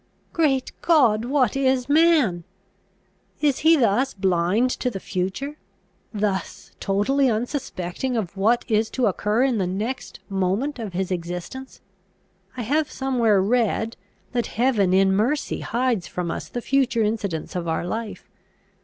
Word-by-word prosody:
Great 275 Hz, -6 st, +1 dB
God! 240 Hz, -10 st, +4 dB
what 260 Hz, -2 st, +1 dB
is 260 Hz, -2 st, +1 dB
man? 290 Hz, -, +3 dB, 1.0 s
Is 290 Hz, -3 st, +1 dB
he 325 Hz, +1 st, +5 dB
thus 250 Hz, +2 st, +2 dB
blind 190 Hz, +5 st, +1 dB
to 250 Hz, -, -1 dB
the 195 Hz, -, -6 dB
future, 195 Hz, +12 st, -3 dB, 0.5 s
thus 205 Hz, -3 st, -3 dB
totally 255 Hz, +8 st, +2 dB
unsuspecting 235 Hz, -, -3 dB
of 200 Hz, -4 st, -3 dB
what 220 Hz, +5 st, +2 dB
is 220 Hz, 0 st, +1 dB
to 255 Hz, -, 0 dB
occur 210 Hz, +4 st, +1 dB
in 255 Hz, -5 st, +1 dB
the 185 Hz, -, 0 dB
next 220 Hz, +8 st, -4 dB
moment 200 Hz, +9 st, -1 dB
of 215 Hz, -5 st, -5 dB
his 190 Hz, +1 st, -2 dB
existence? 180 Hz, +9 st, -5 dB, 0.8 s
I 245 Hz, -, -2 dB
have 295 Hz, +6 st, 0 dB
somewhere 235 Hz, -7 st, +2 dB
read, 225 Hz, 0 st, +1 dB, 0.4 s
that 240 Hz, -1 st, -1 dB
heaven 225 Hz, -6 st, +3 dB
in 190 Hz, +1 st, +4 dB
mercy 245 Hz, +9 st, 0 dB
hides 235 Hz, -4 st, -1 dB
from 175 Hz, -2 st, -3 dB
us -, -, -5 dB
the 245 Hz, -, -4 dB
future 260 Hz, -3 st, +1 dB
incidents 205 Hz, -8 st, -2 dB
of 175 Hz, -1 st, -3 dB
our 160 Hz, +1 st, -1 dB
life. 220 Hz, +3 st, -5 dB
225 Hz, 140 wpm, -23 LUFS, 195-265 Hz, 1.0 s, he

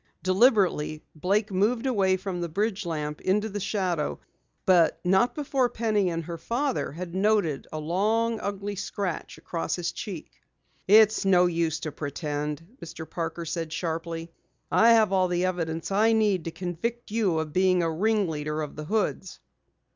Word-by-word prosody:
Deliberately 185 Hz, -, +3 dB
Blake 200 Hz, +7 st, 0 dB
moved 220 Hz, +6 st, +1 dB
away 195 Hz, -7 st, +2 dB
from 185 Hz, -2 st, -4 dB
the 170 Hz, -, -3 dB
bridge 205 Hz, +2 st, -1 dB
lamp 150 Hz, -2 st, -3 dB
into 205 Hz, +3 st, +1 dB
the 205 Hz, 0 st, -4 dB
shadow, 185 Hz, -6 st, -1 dB, 0.5 s
but 175 Hz, -4 st, +4 dB
not 190 Hz, +7 st, +3 dB
before 270 Hz, -4 st, +1 dB
both -, -, -21 dB
Penny 215 Hz, -4 st, +2 dB
and 165 Hz, -1 st, -3 dB
her 170 Hz, +1 st, -6 dB
father 260 Hz, -, -1 dB
had 170 Hz, +3 st, -7 dB
noted 195 Hz, -7 st, +1 dB
a 155 Hz, -, -4 dB
long, 215 Hz, +8 st, 0 dB
ugly 200 Hz, 0 st, -4 dB
scratch 195 Hz, -2 st, -4 dB
across 165 Hz, -, -3 dB
his 175 Hz, -1 st, -2 dB
cheek. 185 Hz, -7 st, -7 dB, 0.6 s
"It's 215 Hz, +2 st, +6 dB
no 180 Hz, -2 st, +5 dB
use 165 Hz, -2 st, 0 dB
to 155 Hz, -, -4 dB
pretend," 150 Hz, +1 st, -4 dB, 0.2 s
Mr. 160 Hz, -1 st, -8 dB
Parker 165 Hz, 0 st, -4 dB
said 165 Hz, -1 st, -3 dB
sharply. 165 Hz, 0 st, -4 dB, 0.4 s
"I 230 Hz, +1 st, +6 dB
have 215 Hz, -4 st, +4 dB
all 185 Hz, -1 st, +3 dB
the 180 Hz, 0 st, 0 dB
evidence 165 Hz, -2 st, -2 dB
I 220 Hz, +3 st, +4 dB
need 205 Hz, -6 st, +2 dB
to 165 Hz, -, -3 dB
convict 190 Hz, +8 st, -4 dB
you 210 Hz, -7 st, +1 dB
of 160 Hz, -1 st, -3 dB
being 185 Hz, -1 st, +3 dB
a 165 Hz, -, 0 dB
ringleader 160 Hz, -6 st, 0 dB
of 150 Hz, -, -7 dB
the 150 Hz, -, -6 dB
Hoods." 195 Hz, -1 st, -2 dB
185 Hz, 160 wpm, -26 LUFS, 165-210 Hz, 0.6 s, It's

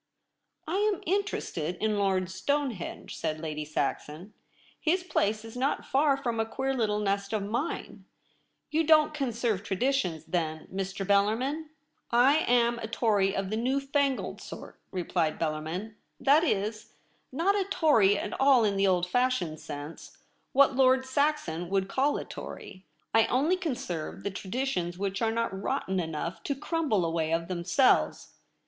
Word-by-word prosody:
' -, -, -43 dB
I 345 Hz, +5 st, -1 dB
am 415 Hz, -2 st, +1 dB
interested 335 Hz, -, -1 dB
in 210 Hz, +1 st, 0 dB
Lord 190 Hz, -2 st, +1 dB
Stonehenge,' 235 Hz, +1 st, -2 dB
said 155 Hz, -1 st, -3 dB
Lady 155 Hz, -1 st, -4 dB
Saxon. 155 Hz, +5 st, -3 dB, 0.2 s
' -, -, -30 dB
His 365 Hz, +1 st, +1 dB
place 215 Hz, -, 0 dB
Is 225 Hz, -, -10 dB
not 265 Hz, +3 st, -1 dB
far 280 Hz, 0 st, +3 dB
from 235 Hz, -4 st, -2 dB
a 225 Hz, -, +2 dB
queer 270 Hz, +3 st, -2 dB
little 220 Hz, -5 st, 0 dB
nest 200 Hz, 0 st, -1 dB
of 210 Hz, -2 st, 0 dB
mine. 235 Hz, +10 st, -4 dB, 0.7 s
You 320 Hz, +2 st, +2 dB
don't 310 Hz, -1 st, +5 dB
conserve 235 Hz, -7 st, -1 dB
traditions, 200 Hz, -, -1 dB
then, 160 Hz, -3 st, -2 dB
Mr. 195 Hz, 0 st, -3 dB
Bellarmin? 225 Hz, +11 st, +1 dB, 0.3 s
* -, -, -46 dB
I 250 Hz, +5 st, +5 dB
am 235 Hz, -1 st, +3 dB
a 220 Hz, -, -4 dB
Tory 205 Hz, -4 st, +1 dB
of 195 Hz, 0 st, -2 dB
the 215 Hz, -, 0 dB
new 260 Hz, +4 st, +1 dB
fangled 275 Hz, -1 st, -1 dB
sort,' -, -, -10 dB
replied 170 Hz, -4 st, -1 dB
Bellarmin; 165 Hz, +7 st, -3 dB
' -, -, -48 dB
that 300 Hz, +4 st, +7 dB
Is, 215 Hz, -, -1 dB, 0.4 s
not 335 Hz, +9 st, +2 dB
a 395 Hz, -2 st, +1 dB
Tory 285 Hz, -, +4 dB
at 205 Hz, -, -4 dB
all 270 Hz, -3 st, +6 dB
in 200 Hz, -2 st, +1 dB
the 195 Hz, 0 st, +3 dB
old 180 Hz, -2 st, +2 dB
fashioned 185 Hz, -7 st, 0 dB
sense 145 Hz, +1 st, -8 dB, 0.2 s
— -, -, -43 dB
what 275 Hz, -1 st, +5 dB
Lord 260 Hz, 0 st, +4 dB
Saxon 260 Hz, -, 0 dB
would 195 Hz, 0 st, +1 dB
call 275 Hz, +7 st, +1 dB
a -, -, -5 dB
Tory. 185 Hz, -2 st, -9 dB, 0.2 s
1 225 Hz, 0 st, +4 dB
only 290 Hz, +9 st, +2 dB
conserve 245 Hz, -, -4 dB
the 200 Hz, -, -2 dB
tra 190 Hz, 0 st, -8 dB
ditions 185 Hz, -8 st, -1 dB
which 195 Hz, +1 st, -2 dB
are 225 Hz, -, +2 dB
not 230 Hz, -2 st, -1 dB
rotten 190 Hz, -1 st, -1 dB
enough 165 Hz, +1 st, -4 dB
to 280 Hz, -, -1 dB
crumble 275 Hz, -, 0 dB
away 165 Hz, -1 st, -1 dB
of 165 Hz, 0 st, 0 dB
themselves. 185 Hz, +9 st, +2 dB
220 Hz, 165 wpm, -28 LUFS, 185-270 Hz, 0.7 s, that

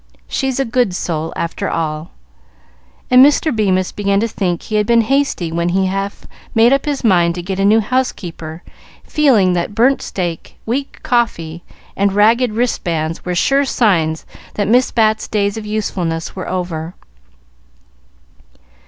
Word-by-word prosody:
She's 265 Hz, -1 st, -2 dB
a 270 Hz, -, +1 dB
good 235 Hz, -5 st, 0 dB
soul, 160 Hz, -3 st, -3 dB
after 170 Hz, -, -3 dB
all;" 155 Hz, -1 st, -3 dB, 1.0 s
and 255 Hz, +1 st, +8 dB
Mr. 290 Hz, 0 st, +3 dB
Bemis 185 Hz, -4 st, +1 dB
began 200 Hz, -1 st, 0 dB
to 230 Hz, -, +1 dB
think 180 Hz, -6 st, -2 dB
he 215 Hz, -, -2 dB
had 210 Hz, 0 st, +1 dB
been 235 Hz, -1 st, +5 dB
hasty 265 Hz, -9 st, 0 dB
when 170 Hz, +1 st, -1 dB
he 190 Hz, +2 st, +1 dB
half 195 Hz, +1 st, -3 dB, 0.3 s
made 230 Hz, +3 st, +5 dB
up 275 Hz, -, +1 dB
his 290 Hz, -3 st, -2 dB
mind 175 Hz, -6 st, +3 dB
to 175 Hz, -, -5 dB
get 190 Hz, +1 st, -4 dB
a 195 Hz, -, +2 dB
new 220 Hz, +2 st, +5 dB
housekeeper, 175 Hz, -9 st, -3 dB, 0.4 s
feeling 240 Hz, -, +3 dB
that 180 Hz, +4 st, -2 dB
burnt 255 Hz, +4 st, +3 dB
steak, 175 Hz, -3 st, -5 dB
weak 270 Hz, +5 st, -4 dB
coffee, 170 Hz, -9 st, -1 dB, 0.3 s
and 200 Hz, 0 st, +1 dB
ragged 225 Hz, +4 st, +3 dB
wristbands 165 Hz, -9 st, -2 dB
were 180 Hz, 0 st, -3 dB
sure 275 Hz, +10 st, +2 dB
signs 170 Hz, -, +1 dB, 0.3 s
that 205 Hz, -2 st, -1 dB
Miss 250 Hz, +4 st, +3 dB
Bat's 220 Hz, -1 st, +1 dB
days 205 Hz, -1 st, 0 dB
of 220 Hz, -1 st, -6 dB
usefulness 180 Hz, -6 st, -3 dB
were 185 Hz, -, -5 dB
over. 175 Hz, -2 st, -4 dB
200 Hz, 155 wpm, -17 LUFS, 175-235 Hz, 1.0 s, and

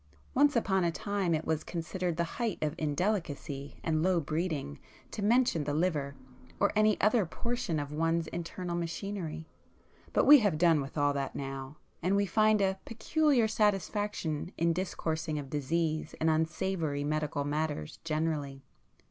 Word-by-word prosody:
Once 290 Hz, +1 st, +4 dB
upon 190 Hz, -5 st, +2 dB
a 170 Hz, -, +2 dB
time 195 Hz, -1 st, -1 dB
it 155 Hz, -, -3 dB
was 160 Hz, -1 st, 0 dB
considered 175 Hz, 0 st, -3 dB
the 170 Hz, -, +2 dB, 0.2 s
height 225 Hz, -5 st, 0 dB
of 150 Hz, -1 st, 0 dB
indelicacy 150 Hz, -4 st, -2 dB
and 155 Hz, -1 st, +1 dB
low 180 Hz, 0 st, +3 dB
breeding 155 Hz, -, -2 dB, 0.3 s
to -, -, -5 dB
mention 225 Hz, -6 st, +3 dB
the 145 Hz, 0 st, -2 dB
'liver' 150 Hz, -4 st, 0 dB, 0.4 s
or -, -, +3 dB
any 215 Hz, 0 st, +4 dB
other 215 Hz, +1 st, +4 dB
portion 235 Hz, -1 st, -2 dB
of 145 Hz, 0 st, -4 dB
one's 165 Hz, +2 st, +1 dB
internal 175 Hz, +1 st, -4 dB
machinery,—but 170 Hz, -1 st, -4 dB
we 295 Hz, 0 st, +10 dB
have 205 Hz, -9 st, +1 dB
done 165 Hz, -2 st, +4 dB
with 135 Hz, +3 st, -7 dB
all 145 Hz, 0 st, +3 dB
that 140 Hz, -1 st, -3 dB
now, 135 Hz, +1 st, -5 dB, 0.2 s
and 185 Hz, +3 st, +2 dB
we 200 Hz, 0 st, +3 dB
find 215 Hz, +1 st, +3 dB
a 190 Hz, 0 st, +1 dB
peculiar 245 Hz, +2 st, +2 dB
satisfaction 205 Hz, -6 st, 0 dB
in 170 Hz, 0 st, +2 dB
discoursing 160 Hz, -3 st, -2 dB
of 140 Hz, -2 st, -6 dB
disease 155 Hz, +2 st, -1 dB
and 160 Hz, 0 st, +3 dB
unsavoury 160 Hz, -2 st, -1 dB
medical 150 Hz, -1 st, -1 dB
matters 150 Hz, -, -2 dB
generally. 155 Hz, -4 st, -2 dB
165 Hz, 150 wpm, -31 LUFS, 150-195 Hz, 0.4 s, we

